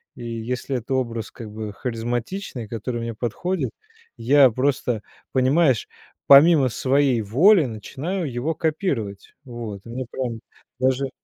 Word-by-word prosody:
и - - -9
если 120 +3 -3
это 125 +3 -4
образ 115 -4 -2
как 110 -3 -10
бы 105 -1 -6
харизматичный, 120 - -4
который 120 +1 -4
мне 115 0 -4
подходит, 130 - -2 0.4
я 130 +3 +5
просто, 130 -2 0 0.3
понимаешь, 130 - +3 0.4
помимо 140 -1 +7
своей 130 -1 +2
воли 155 - +5
начинаю 140 - -4
его 140 +7 -2
копировать. 145 - -2
Вот, 115 -6 -7
и - - -11
мне 125 +2 -4
прям 120 -4 -4 0.4
даже 130 +1 +1
125 Hz, 130 wpm, -23 LUFS, 115-140 Hz, 0.4 s, помимо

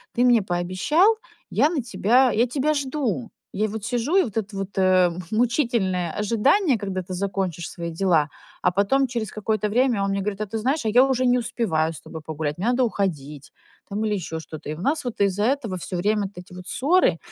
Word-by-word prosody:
ты 245 - +3
мне 240 -3 +5
пообещал, 190 - +2 0.3
я 275 +8 +3
на 320 -6 -1
тебя 245 +2 +3
я 235 +4 +2
тебя 285 +4 0
жду. 260 - -2 0.2
Я 215 +2 0
вот 215 0 -6
сижу, 245 +8 -1
и 385 - +7
вот 225 -2 -5
это 210 -1 -3
вот, 195 0 -5
э, 185 -1 +4 0.2
мучительное 220 - +1
ожидание, 245 - +2
когда 195 -2 -3
ты 185 0 -6
закончишь 190 -3 -2
свои 170 -2 -5
дела, 165 -3 +2 0.3
а - - +3
потом 205 +9 +2
через 230 -4 -4
какое-то 215 0 -1
время 240 -2 +2
он 195 - 0
мне 195 - -1
говорит: 210 +1 -3
"А - - 0
ты 225 - -4
знаешь, 265 +3 0
а - - +2
я 245 +4 +6
уже 260 -1 +1
не 250 0 +4
успеваю 165 -10 0
с - - -9
тобой 160 - -9
погулять, 155 -1 -3
мне 195 - -1
надо 250 +1 +2
уходить 150 - -3 0.4
там 210 +2 -2
или 210 - 0
ещё 160 -3 -4
что-то". 155 -1 -9
И 155 - -3
у 165 - -9
нас 295 +8 0
вот 240 - -5
из-за 200 +1 +2
этого 235 -7 -1
всё 180 +1 -5
время 210 +3 +1
вот 190 - -19
эти 180 0 -11
вот 180 0 -10
ссоры, 310 - +2
210 Hz, 215 wpm, -23 LUFS, 185-245 Hz, 0.4 s, и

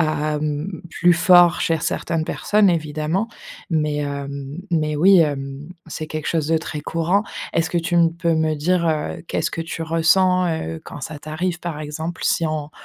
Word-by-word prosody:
à, 155 -1 0
mmh 155 +4 -3
plus 175 +1 +3
fort 175 0 +5
cher 165 -2 0
certaines 165 -1 -1
personnes 210 +3 +2
évidemment, 155 +4 -1 0.4
mais, 150 -3 0
hem, 140 +1 -4
mais 155 -3 +1
oui, 185 +6 +6
hem, 140 -2 -1 0.2
c'est 155 0 -5
quelque 155 0 -5
chose 160 -3 0
de 165 +1 +2
très 160 -2 -4
courant. 165 +7 0 0.3
Est-ce 165 -1 +1
que 175 - 0
tu 165 +1 -1
m 170 -1 +5
peux 170 -1 +1
me 160 0 +1
dire, 170 +3 +1
heu, 155 -2 -2
qu'est-ce - - -1
que - - -4
tu 165 0 -4
ressens, 180 +3 +3
heu, 80 - -3
quand - - -9
ça 150 +3 -6
t'arrive 165 +4 -3
par 170 -4 -5
exemple? 160 +3 -5
Si 165 - +2
on 155 -1 -3
160 Hz, 180 wpm, -21 LUFS, 150-170 Hz, 0.4 s, oui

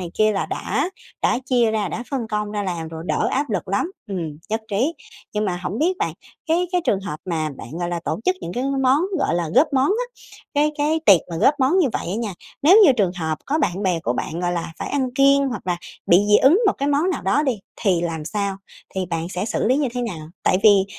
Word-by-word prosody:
này 175 -2 -5
kia 215 0 +4
là 195 - -1
đã 360 - -2 0.3
đã - - +2
chia 245 -3 +2
ra, 215 -3 -1
đã 230 - -4
phân 260 -5 -2
công 210 -1 -2
ra 205 -1 -2
làm 170 -4 -3
rồi, 160 0 -7
đỡ - - +1
áp 280 -1 -1
lực 195 -3 -2
lắm, 200 - 0 0.2
ừm, 165 -6 -4
nhất 220 +1 -1
trí. 250 +11 +1 0.4
Nhưng 210 0 0
mà 185 -3 -1
hổng 205 - -3
biết 355 +6 +1
bạn, - - -1 0.4
cái 345 +3 +2
cái 360 - +2
trường 195 - +1
hợp 170 -6 -5
mà 160 -4 -1
bạn, 115 - -9
gọi 175 -1 -2
là, 175 -1 -2
tổ - - -2
chức 370 0 +2
những 170 - -5
cái 250 +5 -2 0.2
món, 260 +2 +4 0.2
gọi 275 - +1
là, 170 -2 -1
góp 305 0 +4
món 265 0 +3
á, 455 +5 +1 0.5
cái 295 +1 +3
cái 305 +2 +1
tiệc 190 -5 +8
mà 165 - -3
góp 275 - +4
món 275 +8 +3
như 345 - +4
vậy - - -3
á 180 - -2
nha, 220 -3 -3 0.3
nếu 350 +7 +7
như 295 - +7
trường 200 -7 +1
hợp 160 -2 -2
có 300 +3 +1
bạn 195 - 0
bè 180 -4 +1
của 120 - -1
bạn, 160 +6 -4
gọi 175 0 0
là, 170 -1 -3
phải - - -4
ăn 270 -3 0
kiêng 275 0 +4
hoặc 245 - -6
là 180 -1 0 0.3
bị 170 - +6
dị 210 - +7
ứng 315 - +5
một 395 - +5
cái 280 - 0
món 290 +6 +2
nào 365 - -3
đó 295 - +2
đi, 260 -7 0 0.2
thì 190 -6 +2
làm 165 -3 -3
sao, 200 +1 -2 0.4
thì 190 -1 -2
bạn 165 -1 -3
sẽ 185 0 -3
xử 220 - -1
lý 255 +4 +3
như 285 -2 +1
thế 245 - -1
nào? 165 -10 -5
Tại 185 - +3
vì, 200 -3 +6
210 Hz, 260 wpm, -22 LUFS, 175-275 Hz, 0.5 s, tiệc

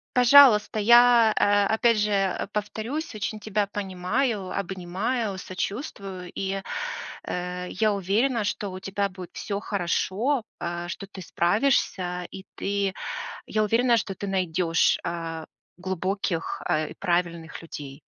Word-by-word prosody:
Пожалуйста. 250 -4 +7
Я, 235 0 +6
а, 205 0 +4
опять 230 +1 +3
же, 210 0 +1
а, 195 -2 0
повторюсь, 220 +9 -4
очень 215 +1 -3
тебя 210 -1 0
понимаю, 200 +2 -2
обнимаю, 195 +4 -2
сочувствую. 190 - -5
И, 195 0 -2 0.7
э, 180 0 -3
я 215 -1 +1
уверена, 210 +5 +1
что 205 0 -2
у 185 - -7
тебя 200 +1 -2
будет 180 -2 -10
всё 200 -1 -3
хорошо, 205 +7 0 0.2
а, 175 0 -4
что 175 +3 -6
ты 195 -1 -10
справишься, 180 -2 +1
и 190 - -9
ты 200 -1 -1 0.5
я 215 - 0
уверена, 235 +3 +3
что 200 -3 -2
ты 200 - -5
найдешь, 180 -3 +2
а, 165 -1 -4 0.3
глубоких, 185 -1 -2
а, 155 0 +1
и - - -10
правильных 170 -3 -1
людей. 145 -3 -9
195 Hz, 130 wpm, -26 LUFS, 180-215 Hz, 0.7 s, Пожалуйста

